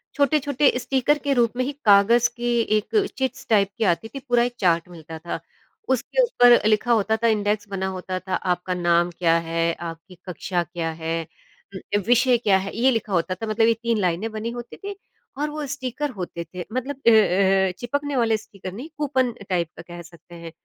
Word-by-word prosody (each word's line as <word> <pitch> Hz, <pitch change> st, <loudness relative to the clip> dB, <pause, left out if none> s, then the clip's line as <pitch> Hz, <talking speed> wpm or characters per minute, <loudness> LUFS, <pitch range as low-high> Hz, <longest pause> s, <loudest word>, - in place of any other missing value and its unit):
छोटे-छोटे 285 Hz, -1 st, +2 dB
स्टीकर 270 Hz, +3 st, +1 dB
के 280 Hz, -, +3 dB
रूप 235 Hz, -3 st, +2 dB
में 255 Hz, -, +1 dB
ही 285 Hz, -, -2 dB
काग़ज़ 220 Hz, +4 st, +5 dB
की 240 Hz, 0 st, 0 dB, 0.2 s
एक 400 Hz, -, 0 dB
चिट्स 265 Hz, -1 st, -3 dB
टाइप 200 Hz, -3 st, +4 dB
की 225 Hz, -, 0 dB
आती 225 Hz, -, -8 dB
थी 275 Hz, -, -8 dB
पूरा 245 Hz, -3 st, +2 dB
एक 245 Hz, 0 st, -2 dB
चार्ट 170 Hz, -1 st, +2 dB
मिलता 160 Hz, -1 st, -10 dB
था 170 Hz, -, -5 dB, 0.5 s
उसके 265 Hz, -, +1 dB
ऊपर 245 Hz, -, +6 dB
लिखा 220 Hz, +3 st, +2 dB
होता 220 Hz, 0 st, +2 dB
था -, -, +5 dB
इंडेक्स 205 Hz, -1 st, 0 dB
बना 190 Hz, -1 st, -2 dB
होता 185 Hz, 0 st, -4 dB
था, 185 Hz, +1 st, -3 dB
आपका 180 Hz, 0 st, -1 dB
नाम 175 Hz, -1 st, +2 dB
क्या 165 Hz, -2 st, +3 dB
है, 165 Hz, 0 st, 0 dB
आपकी 170 Hz, +2 st, -8 dB
कक्षा 180 Hz, 0 st, -2 dB
क्या 170 Hz, 0 st, -4 dB
है, 165 Hz, +1 st, -3 dB, 0.5 s
उम, 205 Hz, +2 st, -2 dB
विषय 245 Hz, 0 st, +4 dB
क्या 205 Hz, -5 st, +3 dB
है, 195 Hz, +1 st, -5 dB
ये 260 Hz, +3 st, +4 dB
लिखा 220 Hz, -4 st, -2 dB
होता 185 Hz, +2 st, 0 dB
था 225 Hz, -, -6 dB
मतलब 225 Hz, +1 st, +2 dB
ये 230 Hz, -, +5 dB
3 230 Hz, -1 st, +1 dB
लाइनें 185 Hz, +4 st, 0 dB
बनी 220 Hz, +1 st, -4 dB
होती 240 Hz, 0 st, -8 dB
थीं 405 Hz, 0 st, -6 dB, 0.5 s
और 300 Hz, -, 0 dB
वो 300 Hz, -1 st, -5 dB
स्टीकर 285 Hz, +1 st, -3 dB
होते 180 Hz, -4 st, -6 dB
थे 180 Hz, -1 st, -5 dB
मतलब 260 Hz, +2 st, -3 dB
अ -, -, +11 dB
अ 195 Hz, -2 st, +4 dB
अ, -, -, -3 dB
चिपकने 285 Hz, +3 st, -2 dB
वाले 225 Hz, -3 st, +2 dB
स्टीकर 195 Hz, -3 st, -10 dB
नहीं 260 Hz, +10 st, -8 dB
कूपन 260 Hz, -4 st, +1 dB, 0.2 s
टाइप 170 Hz, -3 st, 0 dB
का -, -, -7 dB
कह 175 Hz, 0 st, -8 dB
सकते 170 Hz, 0 st, -15 dB
हैं। 170 Hz, -1 st, -9 dB
215 Hz, 205 wpm, -23 LUFS, 180-245 Hz, 0.5 s, अ